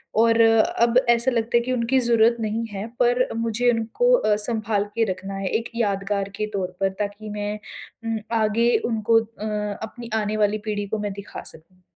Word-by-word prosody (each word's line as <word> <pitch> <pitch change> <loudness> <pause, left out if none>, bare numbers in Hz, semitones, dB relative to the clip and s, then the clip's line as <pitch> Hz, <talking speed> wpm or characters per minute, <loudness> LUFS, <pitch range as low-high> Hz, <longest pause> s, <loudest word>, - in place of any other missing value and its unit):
और 230 +1 +4
अब 225 +1 +4
ऐसा 235 +2 +3
लगता 235 0 +1
है - - +3
कि 255 - -3
उनकी 250 +2 +2
ज़रूरत 235 -1 +3
नहीं 220 +1 -1
है 200 +2 -5
पर 245 +1 +3
मुझे 230 +1 +1
उनको 230 - +1
अ, 215 - +3
सँभाल 215 -1 -1
के 230 - +2
रखना 190 +2 -6
है 195 0 -3
एक 225 +4 -1
यादगार 200 -2 -1
के 215 +1 -2
तौर 185 -2 -3
पर 195 - +2
ताकि 205 +1 -4
मैं 210 0 -4 0.5
उम, 225 -1 -1 0.2
आगे 230 +3 +2
उनको 225 -1 +3
अ, 225 -1 -8 0.4
अपनी 230 +2 -8
आने 210 +1 -2
वाली 210 0 +2
पीढ़ी 205 -1 -2
को 220 - -2
मैं 205 -1 -3
दिखा 200 0 -8
सकूँ। 185 +4 -8
220 Hz, 185 wpm, -23 LUFS, 205-230 Hz, 0.5 s, और